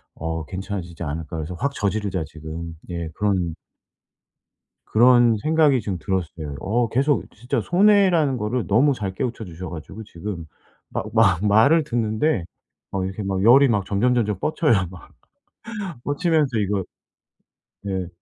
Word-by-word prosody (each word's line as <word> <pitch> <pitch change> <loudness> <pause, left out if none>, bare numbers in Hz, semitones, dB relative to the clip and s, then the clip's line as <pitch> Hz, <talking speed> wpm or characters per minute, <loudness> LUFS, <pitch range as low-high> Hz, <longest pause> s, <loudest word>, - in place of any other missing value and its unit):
어 80 -1 -4
괜찮아지지 95 -2 -6
않을까.' 80 +1 -4
그래서 80 +3 -5
'확 140 +8 -2
저지르자.' 100 - -1
지금 80 +1 -8
예 85 -2 -4
그런 95 -5 0 1.3
그런 120 -1 +5
생각이 150 -1 +3
좀 95 -3 -3
들었어요. 80 -6 -3
어 115 +3 0
계속 140 +3 +1
진짜 120 +2 -2
손해라는 180 - +4
거를 110 +2 -2
너무 130 +8 +4
잘 95 -4 -4
깨우쳐 115 -1 -3
주셔 90 0 -8
가지고 85 +7 -8
지금 85 -3 -7 0.4
막 - - -3
막 95 +6 +3
말을 115 +11 +5
듣는데 115 - 0 0.5
막 95 -1 -1
이렇게 95 +3 -5
막 95 0 -1
열이 135 +5 +7
막 105 -5 +1
점점점점 105 -2 +1
뻗쳐요, 155 -4 +2 0.2
막. 95 - -13 0.9
뻗치면서 145 -4 +1
이거 100 -2 0 1.0
네 95 -3 -3
105 Hz, 285 characters per minute, -23 LUFS, 90-125 Hz, 1.3 s, 열이